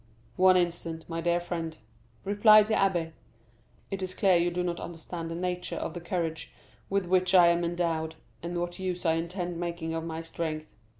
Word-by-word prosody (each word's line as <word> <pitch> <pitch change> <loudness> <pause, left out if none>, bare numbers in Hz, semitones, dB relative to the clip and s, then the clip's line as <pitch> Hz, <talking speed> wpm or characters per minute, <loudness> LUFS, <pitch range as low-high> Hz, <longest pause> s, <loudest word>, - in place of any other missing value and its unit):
"One 185 0 +6
instant, 170 -2 -2
my 165 0 -3
dear 170 +1 +2
friend," 165 -2 -4 0.5
replied 210 +1 +6
the 220 - 0
abbé; 175 -6 +1 0.8
"it 195 0 -3
is 185 0 -4
clear 190 -3 +4
you 175 0 +3
do 180 +1 -2
not 175 -1 -2
understand 165 0 -6
the 165 - -4
nature 180 +1 -3
of - - -4
the 175 - -6
courage 165 -3 -3 0.3
with 195 -1 +1
which 185 +1 +2
I 175 -2 +8
am 170 0 +2
endowed, 165 -2 -1 0.3
and 175 +1 -3
what 175 +1 -4
use 180 -1 -3
I 165 - +4
intend 170 +1 -3
making 170 -2 -3
of 165 0 -2
my 165 0 -5
strength. 155 -2 -5
175 Hz, 185 wpm, -28 LUFS, 165-180 Hz, 0.8 s, I